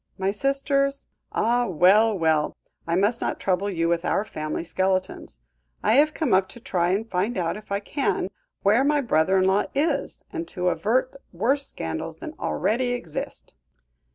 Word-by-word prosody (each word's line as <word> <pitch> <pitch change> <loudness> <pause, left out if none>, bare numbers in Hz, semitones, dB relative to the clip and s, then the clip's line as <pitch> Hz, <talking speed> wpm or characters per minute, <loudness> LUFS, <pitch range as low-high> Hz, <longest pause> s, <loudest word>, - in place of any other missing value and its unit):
My 190 +1 0
sisters 275 +4 0 0.3
Ah! 240 +1 +1
well, 200 +5 +4
well, 160 -3 +1 0.3
I 170 - +1
must 205 +6 +2
not - - -2
trouble 195 +1 0
you 165 -3 0
with 170 0 +1
our 200 - 0
family 155 -6 -4
skeletons. 185 - -1 0.5
I - - +3
have 305 +1 +4
come 290 - 0
up 190 0 +3
to 240 - -11
try 180 -8 0
and 205 +5 0
find 200 +4 -1
out 170 -2 -1
if 210 0 -11
I 200 0 0
can 275 +6 -1 0.3
where 215 +6 +4
my 295 +1 +2
brother 190 - +2
in 185 - +3
law 190 +2 +3
is, 285 0 -1
and 335 -1 -4
to 180 -2 -1
avert 250 +8 0 0.2
worse 265 +10 0
scandals 80 -1 -4
than - - -7
already 240 - 0
exist." 175 -11 -5
200 Hz, 170 wpm, -25 LUFS, 180-250 Hz, 0.5 s, well